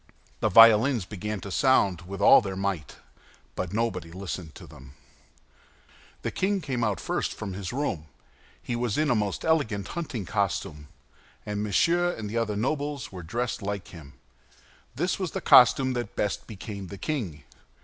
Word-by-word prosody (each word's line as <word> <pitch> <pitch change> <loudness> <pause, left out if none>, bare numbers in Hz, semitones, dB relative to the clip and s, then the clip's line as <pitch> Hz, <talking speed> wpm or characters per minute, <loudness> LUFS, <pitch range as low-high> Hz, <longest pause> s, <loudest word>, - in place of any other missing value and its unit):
The - - +1
violins 115 +1 +7
began 105 +1 -5
to 100 - -7
sound 95 -9 +2
with 100 +1 -6
all - - +8
their 95 -3 -5
might, 95 -7 -3 0.6
but 90 - -4
nobody 100 -6 -2
listened 90 -3 -6
to - - -11
them. 65 +1 -14 1.3
The - - -2
king 195 +1 0
came 130 -8 -3
out 105 -3 0
first - - -2
from 100 -3 -6
his 95 0 -5
room. 120 - -3 0.5
He 120 - -4
was 120 -3 -1
in 150 -2 +2
a - - +3
most 105 -3 -2
elegant 110 -12 0
hunting 140 - -4
costume; 95 -6 -2 0.6
and 105 0 -3
Monsieur 170 - +2
and 110 -2 -6
the 110 +3 -3
other 110 -3 -1
nobles 145 +3 -2
were 95 -2 -8
dressed 115 +9 -3
like 100 -1 -4
him. 80 -5 -12 0.8
This 175 +9 -1
was 185 -5 -3
the - - -2
costume 130 +1 +6
that 120 -4 -4
best 105 -2 -2
became 100 -2 -7
the 100 - -9
king. 100 - -4
105 Hz, 165 wpm, -27 LUFS, 95-125 Hz, 1.3 s, all